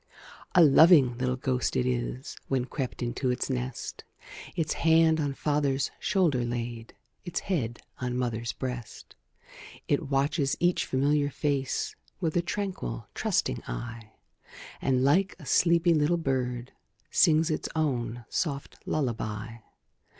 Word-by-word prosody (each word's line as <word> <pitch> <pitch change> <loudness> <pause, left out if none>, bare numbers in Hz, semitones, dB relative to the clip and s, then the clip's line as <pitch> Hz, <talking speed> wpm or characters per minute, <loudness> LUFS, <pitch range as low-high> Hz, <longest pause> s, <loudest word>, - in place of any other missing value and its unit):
A 175 - +8
loving 145 -4 +7
little 125 0 0
ghost 130 -1 -1
it 65 - +1
is: - - -2
When 130 -2 0
crept 130 -2 -4
into 120 +2 -1
its 125 +2 -1
nest, 125 -1 -4 0.5
Its 160 -2 0
hand 160 0 +4
on 145 -2 -1
father's 145 -2 0
shoulder 165 -11 +2
laid, 120 -1 -4 0.3
Its 175 -2 -3
head 120 - -2 0.2
on 125 -1 -2
mother's 120 -2 -2
breast, 125 -4 -7 0.7
It - - 0
watches 140 +1 +1
each 175 0 +2
familiar 145 +2 +2
face, 140 -2 -1 0.2
With 165 -4 -1
a 175 - +3
tranquil, 180 - -4
trusting - - 0
eye; 115 - -6 0.7
And, 130 -1 +2
like 185 +8 +3
a 155 - -12
sleepy 170 +2 +4
little 155 +2 +2
bird, 125 -5 -2 0.4
Sings 160 +1 +4
its 155 - -2
own 120 -6 -1
soft 140 -4 -3
lullaby. 115 -5 -2
135 Hz, 130 wpm, -28 LUFS, 120-155 Hz, 0.7 s, A